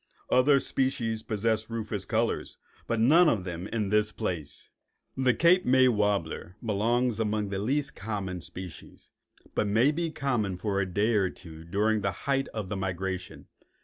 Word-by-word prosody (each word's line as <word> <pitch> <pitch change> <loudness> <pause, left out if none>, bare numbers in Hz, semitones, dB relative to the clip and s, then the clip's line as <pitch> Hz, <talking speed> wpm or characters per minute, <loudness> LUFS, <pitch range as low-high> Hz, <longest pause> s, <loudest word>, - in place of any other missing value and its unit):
Other 140 +2 +5
species 115 -5 -1
possess 110 0 -1
rufous 110 -4 -4
colors, 115 0 -1 0.3
but 115 - 0
none 155 +9 +6
of 105 -9 0
them 90 +1 -5
in 105 -3 -2
this 105 +1 +2
place. 80 -8 -5 0.4
The 130 -2 +2
Cape 180 +2 +5
May 130 +1 +5
warbler 100 -5 -1
belongs 115 +2 +1
among 105 -2 0
the 100 -1 -2
less 140 +6 0
common 95 -4 -4
species, 90 -1 -10 0.4
but 105 - 0
may 115 +8 +4
be 165 +2 -2
common 120 - -1
for 100 +1 -1
a 95 - -1
day 105 +5 +2
or 100 -3 +2
two 80 -3 -11
during 105 +5 +1
the 100 0 0
height 135 -1 +1
of 110 -4 -5
the 105 - -3
migration. 95 -1 -4
105 Hz, 160 wpm, -28 LUFS, 95-125 Hz, 0.4 s, none